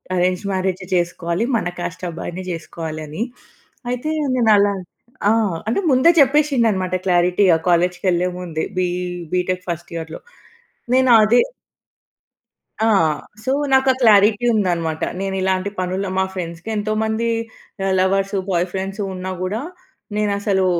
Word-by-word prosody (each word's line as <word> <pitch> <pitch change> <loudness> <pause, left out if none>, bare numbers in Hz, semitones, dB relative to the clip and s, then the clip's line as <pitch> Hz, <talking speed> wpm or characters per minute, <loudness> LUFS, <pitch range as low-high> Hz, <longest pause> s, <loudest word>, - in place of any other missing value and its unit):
Arranged 180 +2 0
మ్యారేజే 185 -1 -2
చేసుకోవాలి, 175 +3 -1
మన 205 -6 0
కాస్ట్ 180 +1 -5
అబ్బాయిననే 170 +2 -6
జేసుకోవాలి" 160 -1 -6
అని. 160 +10 -3 0.7
అయితే, 250 +5 -2 0.2
నేను 230 -3 +3
అలా 200 0 +3 0.6
ఆ! - - +5 0.4
అంటే, 230 - +1
ముందే 260 +6 +5
చెప్పేసిండన్నమాట 240 -10 +2
క్లారిటీగా, 180 0 +4
కాలేజ్‌కేళ్ళే 180 +1 +2
ముందే, 165 -3 -4 0.2
బీ 180 - +2 0.5
బీటెక్ 180 0 0
ఫర్స్ట్ 170 0 -5
ఇయర్‌లో. 160 -1 -6 0.7
నేను 260 0 +4
అదే 230 +3 +4 1.5
ఆ! - - +3 0.6
సో, 260 - 0 0.2
నాకు 265 0 +4
ఆ - - +2
క్లారిటీ 210 +1 +5
ఉందనమాట. 170 -6 0 0.2
నేను 195 0 -2
ఇలాంటి 190 +1 0
పనుల 185 +2 -2
మా 190 - +2
ఫ్రెండ్స్‌కి 175 +1 -6
ఎంతోమంది 220 +2 -1 0.5
ఆహ్, 195 -1 +1
లవర్సు, 195 +1 +1
బాయ్ 175 -1 +1
ఫ్రెండ్సు 195 +2 -4
ఉన్నా 185 0 -5
గూడా, 200 +5 -2 0.5
నేను 210 -1 +1
అసలు 195 -2 +1
190 Hz, 125 wpm, -20 LUFS, 180-215 Hz, 1.5 s, ఆ